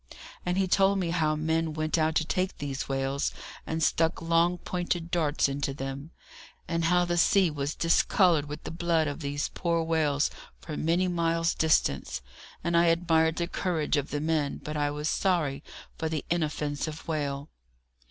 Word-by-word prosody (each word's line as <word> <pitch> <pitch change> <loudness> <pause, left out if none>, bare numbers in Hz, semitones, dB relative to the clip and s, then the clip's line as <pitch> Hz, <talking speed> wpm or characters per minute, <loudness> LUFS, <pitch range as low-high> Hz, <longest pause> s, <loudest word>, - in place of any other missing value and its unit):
And 180 +1 +1
he 190 -1 +2
told 195 +2 +3
me 175 -3 -1
how 155 -3 +1
men 160 0 0
went 155 0 0
out 160 -1 +1
to 155 - +2
take 185 +3 -1
these 140 -2 -4
whales, 135 +1 -1 0.4
and 160 0 -1
stuck 165 +2 +2
long 170 +1 +2
pointed 175 -1 -3
darts 155 -5 +2
into 140 0 -2
them; 135 +2 -5 0.6
and 165 -1 0
how 180 +1 +3
the 175 0 -1
sea 185 0 +4
was 145 0 -3
discoloured 165 -1 +3
with 150 +1 -7
the - - -5
blood 165 -1 +1
of 145 - -4
these 145 -1 -2
poor 170 -1 0
whales 155 -3 +1 0.3
for 155 - -7
many 170 +4 +1
miles' 165 -1 +1
distance; 70 - +1 0.4
and 170 0 0
I 170 0 +5
admired 165 -1 +3
the 170 - -1
courage 170 -5 -1
of 145 -1 -1
the 145 - -2
men, 155 -2 0
but 150 - -5
I 145 -1 +1
was 150 +1 -3
sorry 155 -7 0 0.4
for 160 - -1
the 155 -2 -3
inoffensive 155 -1 -2
whale. 145 -2 -3
160 Hz, 170 wpm, -28 LUFS, 145-170 Hz, 0.6 s, I